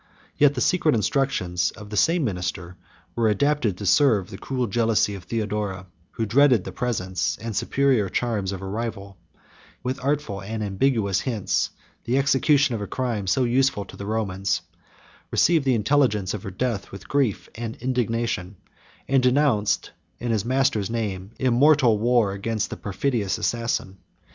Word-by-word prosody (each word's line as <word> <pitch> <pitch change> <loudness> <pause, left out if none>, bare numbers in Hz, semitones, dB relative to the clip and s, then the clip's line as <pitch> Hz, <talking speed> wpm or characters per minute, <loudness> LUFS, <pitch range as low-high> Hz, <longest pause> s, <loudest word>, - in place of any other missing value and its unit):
55a - - -31
Yet 145 -1 +6
the 125 - -2
secret 160 -3 +3
instructions 105 -6 0
of 105 -1 -12
the - - -4
same 165 - +3
minister 90 -4 -3 0.4
were 115 -1 +2
adapted 115 -3 +1
to 100 - -6
serve 100 -1 +3
the 95 - -7
cruel 130 -2 -2
jealousy 110 -1 +1
of 95 -3 -9
Theodora, 105 -3 -3 0.3
who 115 - -2
dreaded 125 -1 +4
the - - -6
presence 95 -7 -2
and 115 -2 -5
superior 130 -7 +1
charms 105 -5 -1
of 95 -1 -6
a - - -4
rival: 100 -2 -5
he 80 -3 -38
prompted, - - -28
with 130 +1 -3
artful 140 -8 -1
and 110 +2 -4
ambiguous 100 -1 +1
hints, 115 -7 -1 0.4
the 125 +3 +1
execution 140 0 +3
of 110 - -3
a 100 - -4
crime 115 -6 -2
so 95 +8 +2
useful 125 -4 +1
to - - -12
the 100 - -7
Romans;56 95 -5 -2 0.6
received 165 -5 +3
the 130 -2 +3
intelligence 105 -5 +2
of 105 - -4
her 100 - -6
death 110 +2 -3
with 100 - -10
grief 135 -8 0
and 115 0 -5
indignation, 115 -6 -2 0.5
and 135 -1 +3
denounced, 125 -5 +2 0.3
in 120 -1 -3
his 110 -3 +1
master's 130 -4 +1
name, 100 -5 -3
immortal 130 -2 +4
war 120 -2 +3
against 105 +2 -2
the - - -3
perfidious 105 0 -1
assassin. 115 -5 -2
115 Hz, 165 wpm, -24 LUFS, 100-130 Hz, 0.6 s, Yet